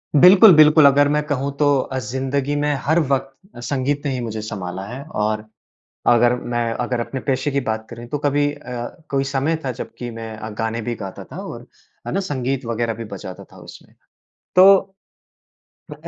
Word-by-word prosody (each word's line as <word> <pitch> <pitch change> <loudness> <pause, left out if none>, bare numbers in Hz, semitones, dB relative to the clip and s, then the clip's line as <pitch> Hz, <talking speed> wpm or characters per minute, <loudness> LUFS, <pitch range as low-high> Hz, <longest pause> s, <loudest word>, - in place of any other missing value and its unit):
बिल्कुल, 185 +6 +8
बिल्कुल। 155 0 +7
अगर 140 +1 +5
मैं 150 +1 +2
कहूँ 140 -1 -1
तो 145 -2 +3
अ, 130 +1 -3
ज़िंदगी 135 +4 -2
में 145 0 +1
हर 160 +5 +2
वक़्त 135 -3 0 0.2
अ, - - -10
संगीत 140 +3 -2
ने 140 - 0
ही 130 - -3
मुझे 110 -2 -4
संभाला 95 -4 -5
है 125 +5 -7 0.2
और 105 0 -1 0.6
अगर 120 0 +5 0.2
मैं 120 -1 0
अगर 125 +1 -2
अपने 130 +3 -4
पेशे 140 +1 -1
की 140 - +1
बात 110 -3 -3
करें 120 0 -9
तो 145 - -2
कभी 145 0 +1
अ, 145 - -13 0.5
कोई 135 -1 0
समय 140 +4 0
था 130 - -1
जबकि 120 - -6
मैं 115 -1 -7
अ, 110 +1 -7
गाने 110 +2 -3
भी 120 +2 -3
गाता 95 -3 -8
था - - -11
और - - -9 0.4
है - - -3
ना? 195 - +1
संगीत 135 -6 -2
वगैरह 115 0 -1
भी 115 +1 -7
बजाता 95 -3 -8
था - - -15
उसमें। - - -14 0.6
तो 190 +2 +9 1.2
अ, - - -15
130 Hz, 190 wpm, -20 LUFS, 115-145 Hz, 1.2 s, तो